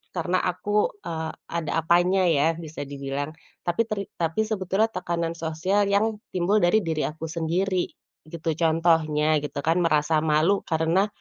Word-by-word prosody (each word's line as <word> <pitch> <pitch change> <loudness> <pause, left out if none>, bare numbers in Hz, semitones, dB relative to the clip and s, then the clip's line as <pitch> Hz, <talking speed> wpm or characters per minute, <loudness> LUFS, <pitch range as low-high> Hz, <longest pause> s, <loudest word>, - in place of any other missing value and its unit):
karena 175 +1 0
aku, 205 +4 0 0.2
eee, 160 -1 -3 0.2
ada 165 -2 -3
apanya 175 +3 +3
ya, 155 0 +3
bisa 155 -1 -7
dibilang, 140 +1 -4 0.3
tapi 175 +6 +1
teri 210 -3 -2 0.2
tapi 165 +5 +1
sebetulnya 215 0 0
tekanan 170 -4 -2
sosial 165 +6 0
yang 210 +2 +1
timbul 185 +3 +2
dari 200 +3 +3
diri 160 -2 -1
aku 155 +1 -6
sendiri, 175 +3 0 0.4
gitu. 165 +1 -4
Contohnya, 160 -2 +2
gitu 145 -1 -5
kan, 165 +3 +2
merasa 155 -2 +2
malu 155 +5 +2
karena, 165 +4 +2
165 Hz, 145 wpm, -25 LUFS, 155-185 Hz, 0.4 s, apanya